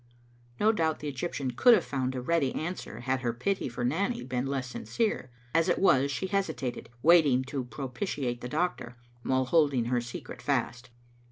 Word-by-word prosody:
No 215 Hz, +1 st, +5 dB
doubt 160 Hz, -7 st, 0 dB
the 145 Hz, -1 st, -5 dB
Eg3rptian 130 Hz, -3 st, -3 dB
could 245 Hz, -, +7 dB
have -, -, 0 dB
found 130 Hz, -2 st, -2 dB
a 125 Hz, -, -2 dB
ready 140 Hz, -1 st, +1 dB
an 175 Hz, +3 st, -2 dB
swer -, -, -9 dB
had 130 Hz, +1 st, -1 dB
her 120 Hz, -2 st, -1 dB
pity 160 Hz, +8 st, -1 dB
for 120 Hz, 0 st, -3 dB
Nanny 200 Hz, -, 0 dB
been 125 Hz, +1 st, -2 dB
less 130 Hz, -3 st, -3 dB
sinjcere; 220 Hz, -, -1 dB, 0.3 s
as 165 Hz, +1 st, +3 dB
it -, -, +3 dB
was, 140 Hz, -7 st, +4 dB
she 140 Hz, -, -2 dB
hesitated, 160 Hz, -, -2 dB
wanting 150 Hz, -6 st, +6 dB
to 130 Hz, -1 st, -4 dB
propitiate 130 Hz, -1 st, -4 dB
the 125 Hz, -, -5 dB
doctor, 150 Hz, -6 st, -2 dB, 0.2 s
while 130 Hz, +1 st, +1 dB
holding 140 Hz, -4 st, +3 dB
her 120 Hz, 0 st, +1 dB
secret 120 Hz, 0 st, -8 dB
fast. 120 Hz, +1 st, -1 dB
135 Hz, 180 wpm, -29 LUFS, 125-170 Hz, 0.3 s, could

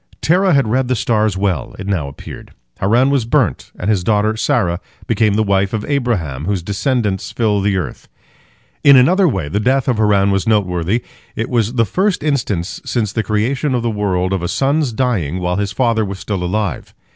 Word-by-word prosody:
Terah 180 Hz, +1 st, +3 dB
had 140 Hz, -5 st, +2 dB
read 125 Hz, +3 st, +1 dB
the 125 Hz, -, +1 dB
stars 110 Hz, -3 st, 0 dB
well, 95 Hz, -9 st, -2 dB
it 100 Hz, -, -7 dB
now 95 Hz, -8 st, -1 dB
appeared: 70 Hz, -, -10 dB, 0.3 s
Haran 120 Hz, +8 st, +3 dB
was 140 Hz, -4 st, +2 dB
burnt, 115 Hz, -, 0 dB
and 90 Hz, -, -4 dB
his 105 Hz, -4 st, +1 dB
daughter 105 Hz, +2 st, +1 dB
Sarah 90 Hz, -6 st, 0 dB, 0.3 s
became 110 Hz, -3 st, +1 dB
the 110 Hz, -, +2 dB
wife 100 Hz, 0 st, +1 dB
of 110 Hz, -1 st, -2 dB
Abraham, 100 Hz, -, -1 dB
whose 95 Hz, -2 st, -1 dB
descendants 105 Hz, 0 st, -1 dB
fill 105 Hz, -4 st, +1 dB
the 100 Hz, 0 st, +1 dB
earth. 95 Hz, -, -5 dB, 0.8 s
In 140 Hz, -1 st, +8 dB
another 180 Hz, +9 st, +5 dB
way 95 Hz, -, -1 dB
the 90 Hz, +8 st, -1 dB
death 130 Hz, +4 st, +1 dB
of 125 Hz, -4 st, +1 dB
Haran 100 Hz, -2 st, +3 dB
was 100 Hz, +1 st, 0 dB
noteworthy. 100 Hz, 0 st, +1 dB, 0.3 s
It 115 Hz, -, -3 dB
was 115 Hz, -2 st, +1 dB
the 115 Hz, -2 st, +3 dB
first 185 Hz, -, 0 dB
instance, 110 Hz, -, -2 dB
since 110 Hz, -5 st, -2 dB
the 110 Hz, -, 0 dB
creation 125 Hz, +6 st, -1 dB
of 120 Hz, -, -1 dB
the 115 Hz, -, 0 dB
world, 95 Hz, -3 st, -1 dB
of 95 Hz, -, -1 dB
a 85 Hz, -, -2 dB
son's 140 Hz, -, 0 dB
dying 110 Hz, -, -1 dB
while 90 Hz, 0 st, -1 dB
his 100 Hz, 0 st, -1 dB
father 115 Hz, 0 st, +1 dB
was 100 Hz, -1 st, -5 dB
still 95 Hz, -1 st, -3 dB
alive. 100 Hz, +2 st, -3 dB
105 Hz, 195 wpm, -17 LUFS, 95-125 Hz, 0.8 s, In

